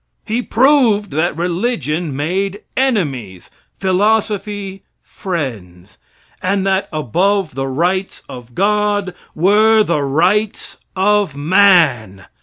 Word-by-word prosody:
He 225 +3 -1
proved 240 -5 +2
that 160 +1 -1
religion 170 - -2
made 190 +8 -2
enemies 140 - -2 0.3
philosophy, 205 0 -1 0.2
friends 110 - -6 0.4
and 195 +1 0
that 195 0 0
above 175 - 0
the 135 +1 -3
rites 180 +8 -2
of 125 -1 -11
gods 205 0 0 0.2
were 215 +5 +4
the 170 -7 -1
rights 180 +10 0 0.2
of 195 -5 +1
man. 150 - +3
185 Hz, 95 wpm, -16 LUFS, 145-205 Hz, 0.4 s, were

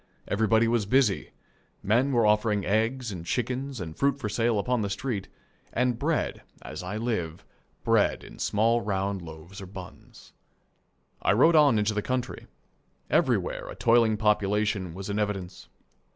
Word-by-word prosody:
Everybody 110 +2 +3
was 115 -3 +1
busy. 125 -4 +2 0.5
Men 120 +7 +2
were 120 -4 +3
offering 105 -1 +2
eggs 115 +3 0
and 90 -4 -6
chickens 125 +7 -2
and 80 -4 -6
fruit 140 0 +1
for 125 -6 -4
sale 115 +1 +1
upon 125 +3 0
the 100 - -1
street, 100 0 -3 0.4
and 125 -1 0
bread, 155 +3 -1 0.2
as 75 +3 -7
I 90 +4 -4
live, 100 -8 -3 0.4
bread - - +2
in - - -13
small 115 +3 +2
round 100 -2 -2
loaves 85 +4 -10
or 95 - -8
buns. 95 -2 -12 0.9
I - - +3
rode 160 +10 +5
on 145 -7 +6
into 105 +1 +1
the 105 - -1
country. 125 +2 -3 0.6
Everywhere - - +1
a - - -7
toiling 115 -2 +3
population 105 -3 +1
was 95 +1 -6
in 105 +1 -2
evidence. 95 -3 -3
105 Hz, 150 wpm, -27 LUFS, 100-120 Hz, 0.9 s, on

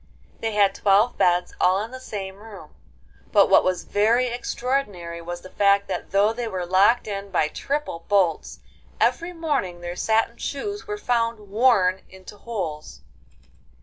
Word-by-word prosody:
They 225 -1 -2
had 200 -2 +3
twelve 205 +5 +3
beds 180 0 +2
all 185 +2 +4
in 225 - -8
the 260 - -8
same 195 -6 -6
room, 205 -7 -12 0.6
but - - +4
what - - +7
was 185 -1 -1
very 225 +5 +2
extraordinary 235 -8 -3
was 175 +1 -6
the 185 - -12
fact 200 0 +3
that - - -4
though 200 +3 +3
they 240 0 -4
were 185 -4 -3
locked 195 +7 +3
in 200 -1 -5
by 165 -5 +1
triple 280 - -4
bolts, 190 -5 0 0.4
every 340 +1 +1
morning 285 - -2
their 175 0 -5
satin 225 +3 +1
shoes 410 +9 -5
were 420 0 -3
found 230 - -1
worn 200 -5 +3
into 190 +2 -13
holes. 190 -9 -6
205 Hz, 155 wpm, -23 LUFS, 185-235 Hz, 0.6 s, what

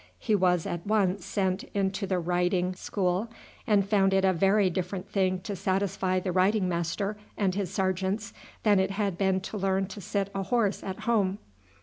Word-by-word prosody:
He 220 - -1
was 180 -4 +3
at 175 +2 -4
once 200 -3 +1
sent 190 -1 -1
into 195 0 0
the 185 -1 0
riding 180 +1 +1
school, 185 +3 -1 0.4
and 205 -2 +4
he - - -11
found 195 -2 +3
it 190 0 +3
a 190 - +4
very 195 +3 +3
different 180 +1 -3
thing 185 -2 +1
to 205 +1 -4
satisfy 185 0 0
the 185 0 -2
riding 190 +2 +2
master 180 +4 -2 0.2
and 195 -3 +1
his 195 -2 -2
sergeants 190 +2 -1 0.3
than 205 -3 +4
it 190 0 +1
had 195 -2 -1
been 190 0 +1
to 210 +2 -5
learn 195 0 +1
to 205 - -8
sit 200 +1 -2
a 195 - -2
horse 210 0 0
at 190 +1 -5
home. 210 -4 +1
190 Hz, 190 wpm, -28 LUFS, 185-200 Hz, 0.4 s, and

